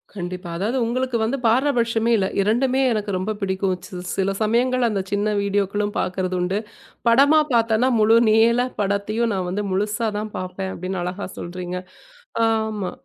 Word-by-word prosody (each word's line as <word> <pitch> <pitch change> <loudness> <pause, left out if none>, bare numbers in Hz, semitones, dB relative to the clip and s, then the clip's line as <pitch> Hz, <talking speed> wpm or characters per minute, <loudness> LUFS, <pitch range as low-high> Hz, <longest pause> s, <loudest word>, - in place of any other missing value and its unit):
கண்டிப்பா. 180 -1 -5
அதாவது 220 +8 -1
உங்களுக்கு 250 +1 -1
வந்து 255 +5 0
பாரபட்சமே 235 -2 +2
இல்ல. 190 - +1
2மே 250 +6 +2
எனக்கு 210 -2 -1
ரொம்ப 195 +4 -2
பிடிக்கும். 190 -1 0
சி 185 - -14 0.2
சில 195 0 +1
சமயங்கள் 245 +3 +2
அந்தச் 195 -3 -2
சின்ன 205 +1 +1
வீடியோக்களும் 205 +1 -1
பாக்குறதுண்டு. 185 +1 -1 0.5
படமா 280 +6 +6
பார்த்தேன்னா 230 +1 +3
முழு 220 +2 +5
நீளப்படத்தையும் 225 -1 +1
நான் 185 -2 -2
வந்து 205 +3 -2
முழுசாதான் 210 +2 -1
பார்ப்பேன் 185 +1 -4
அப்படின்னு 185 +1 -4
அழகா 180 +3 -4
சொல்றீங்க. 180 +1 -5 0.7
ஆமா. 220 -4 -1
210 Hz, 135 wpm, -22 LUFS, 190-230 Hz, 0.7 s, படமா